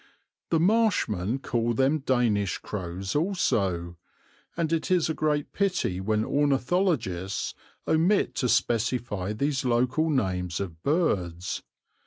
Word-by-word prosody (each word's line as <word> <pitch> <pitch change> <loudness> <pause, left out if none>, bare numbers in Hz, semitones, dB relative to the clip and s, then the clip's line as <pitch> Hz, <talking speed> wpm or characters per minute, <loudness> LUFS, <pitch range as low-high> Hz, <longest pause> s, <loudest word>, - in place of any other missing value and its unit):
The 165 - +2
marshmen 165 - +2
call 120 -3 -1
them 135 +5 +2
Danish 120 -8 +1
crows 95 0 -5
also, 100 - 0 0.6
and 165 -1 0
it 165 - -1
is 175 -3 +2
a - - -1
great 150 -2 -1
pity 185 - 0
when 110 +2 0
ornithologists 140 - 0 0.3
omit 175 +6 +2
to 125 - +1
specify 115 -4 0
these 140 +5 -1
local 125 +6 +1
names 90 - -1
of 85 -5 -6
birds. 95 - 0
125 Hz, 115 wpm, -27 LUFS, 95-155 Hz, 0.6 s, The